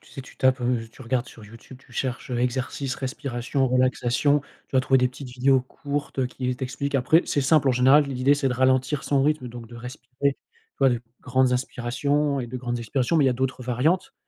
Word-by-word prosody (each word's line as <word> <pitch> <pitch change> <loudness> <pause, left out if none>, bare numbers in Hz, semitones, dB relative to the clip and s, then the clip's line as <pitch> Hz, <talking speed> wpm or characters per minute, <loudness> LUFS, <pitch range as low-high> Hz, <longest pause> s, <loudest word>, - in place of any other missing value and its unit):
Tu - - -20
sais, - - -7
tu - - -16
tapes, 130 0 +2
heu, 120 -2 0
tu 115 - -14
regardes 125 +1 -1
sur 110 -5 -13
YouTube. 115 +4 -13
Tu - - -24
cherches, 125 +1 -3
heu, 120 - -1
exercices, 130 +2 -2
respiration, 130 0 -2
relaxation. 130 +3 +2 0.3
Tu - - -1
vas - - +6
trouver 130 +1 +3
des 125 0 +3
petites 130 +1 -10
vidéos 130 +1 +3
courtes, 140 +1 -4
heu, 130 - +1
qui 125 0 -3
t'expliquent. 130 +2 -4
Après, 145 +6 +4
c'est 145 - 0
simple. 140 +1 +3
En - - +4
général, 130 +4 +5
l'idée, 135 0 +2
c'est 145 -2 0
de - - -1
ralentir 130 +2 +2
son 140 -1 +1
rythme 150 -4 0
donc 120 -1 -9
de 120 - -13
respirer, 125 +1 -10
tu 140 -1 +3 0.4
vois, 135 -1 +5
de 120 -2 -1 0.2
grandes 130 0 +2
inspirations 140 +4 0
et 125 - -3
de 125 +2 -6
grandes 120 -1 -3
expirations 125 +6 0
mais 150 - +4
il - - +4
y - - +4
a - - +1
d'autres 130 0 -2
variantes. 130 +9 0
130 Hz, 225 wpm, -24 LUFS, 125-140 Hz, 0.4 s, vas